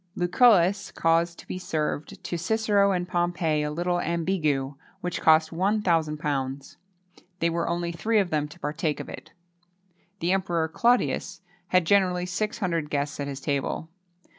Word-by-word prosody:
Lucullus 195 Hz, 0 st, +4 dB
caused 165 Hz, +1 st, +1 dB
to -, -, -13 dB
be 185 Hz, -, -5 dB
served 155 Hz, -3 st, -3 dB
to -, -, -3 dB
Cicero 200 Hz, +2 st, +2 dB
and 180 Hz, -1 st, -1 dB
Pompey 175 Hz, -3 st, 0 dB
a 150 Hz, -, -1 dB
little 175 Hz, +3 st, -1 dB
ambigu, 160 Hz, -6 st, 0 dB, 0.3 s
which 180 Hz, -1 st, -3 dB
cost 160 Hz, 0 st, +5 dB
£1,000. 155 Hz, -8 st, -1 dB, 0.6 s
There 170 Hz, -1 st, +1 dB
were 170 Hz, 0 st, -1 dB
only 170 Hz, 0 st, -1 dB
three 215 Hz, +7 st, 0 dB
of 195 Hz, -4 st, +1 dB
them 150 Hz, -1 st, 0 dB
to 150 Hz, +4 st, -15 dB
partake 150 Hz, 0 st, -2 dB
of -, -, -7 dB
it! -, -, -10 dB, 0.9 s
The 175 Hz, -1 st, 0 dB
Emperor 175 Hz, -4 st, 0 dB
Claudius 235 Hz, -1 st, +1 dB, 0.3 s
had 180 Hz, -1 st, +3 dB
generally 180 Hz, -1 st, +3 dB
six 210 Hz, +4 st, -2 dB
hundred 170 Hz, -7 st, -1 dB
guests 145 Hz, +1 st, -2 dB
at 140 Hz, -, -2 dB
his 140 Hz, -1 st, -6 dB
table. 140 Hz, +3 st, -2 dB
170 Hz, 150 wpm, -26 LUFS, 155-185 Hz, 0.9 s, cost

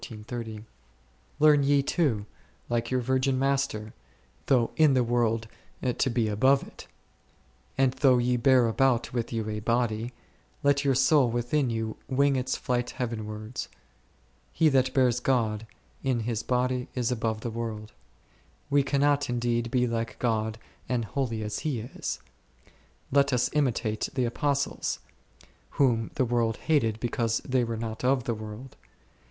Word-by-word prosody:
Learn 150 Hz, -1 st, +6 dB
ye 140 Hz, 0 st, +3 dB
too, 135 Hz, -10 st, 0 dB, 0.4 s
like 115 Hz, 0 st, -1 dB
your 130 Hz, -1 st, +1 dB
virgin 130 Hz, +1 st, +1 dB
Master, 135 Hz, -6 st, -1 dB, 0.5 s
though 120 Hz, -4 st, +3 dB
in 155 Hz, -4 st, +5 dB
the 125 Hz, -, +3 dB
world 115 Hz, -2 st, +1 dB, 0.5 s
to 135 Hz, -, +2 dB
be 115 Hz, -2 st, +1 dB
above 130 Hz, +7 st, +3 dB
it; -, -, -13 dB, 0.9 s
and 135 Hz, -1 st, +3 dB
though 130 Hz, -2 st, +4 dB
ye 125 Hz, +1 st, +2 dB
bear 125 Hz, 0 st, +4 dB
about 120 Hz, 0 st, +1 dB
with 120 Hz, -2 st, -2 dB
you 115 Hz, -2 st, -2 dB
a 105 Hz, 0 st, -3 dB
body, 115 Hz, +1 st, 0 dB, 0.5 s
let 140 Hz, 0 st, +3 dB
your 135 Hz, -2 st, +2 dB
so 135 Hz, +3 st, +5 dB
ill 125 Hz, -, +2 dB
within 120 Hz, +4 st, 0 dB
you 115 Hz, -1 st, -3 dB
wing 140 Hz, +1 st, +2 dB
its 130 Hz, 0 st, -1 dB
flight 125 Hz, -1 st, -1 dB
heavenwards. 110 Hz, -1 st, -4 dB, 0.8 s
He 160 Hz, 0 st, +3 dB
that 130 Hz, -2 st, +2 dB
bears 125 Hz, -2 st, +3 dB
God 115 Hz, -4 st, 0 dB, 0.3 s
in 130 Hz, -3 st, 0 dB
his 115 Hz, 0 st, -2 dB
body 125 Hz, 0 st, 0 dB
is 125 Hz, -1 st, 0 dB
above 110 Hz, -2 st, -1 dB
the 120 Hz, -, -4 dB
world. 110 Hz, -2 st, -5 dB, 0.8 s
We 145 Hz, 0 st, +5 dB
cannot 140 Hz, +1 st, +1 dB
indeed 120 Hz, -1 st, 0 dB
be 125 Hz, 0 st, +2 dB
like 115 Hz, -1 st, -3 dB
God 110 Hz, -2 st, -1 dB, 0.3 s
and 120 Hz, -3 st, 0 dB
holy 115 Hz, -3 st, -2 dB
as 105 Hz, 0 st, -3 dB
He 145 Hz, -7 st, -2 dB
is; 115 Hz, +3 st, -5 dB, 0.9 s
let 140 Hz, +1 st, +4 dB
us 125 Hz, -2 st, +1 dB
imitate 120 Hz, -7 st, 0 dB
the 130 Hz, -2 st, +1 dB
Apostles, 140 Hz, +3 st, -1 dB, 0.8 s
whom 115 Hz, -5 st, +2 dB
the 130 Hz, -, +2 dB
world 115 Hz, -2 st, 0 dB
hated 115 Hz, -9 st, +1 dB
because 115 Hz, -1 st, 0 dB
they 130 Hz, -1 st, +2 dB
were 115 Hz, -1 st, -3 dB
not 110 Hz, 0 st, -5 dB
of 130 Hz, 0 st, +2 dB
the 120 Hz, -, -1 dB
world. 110 Hz, +4 st, -8 dB
125 Hz, 145 wpm, -27 LUFS, 115-135 Hz, 0.9 s, Learn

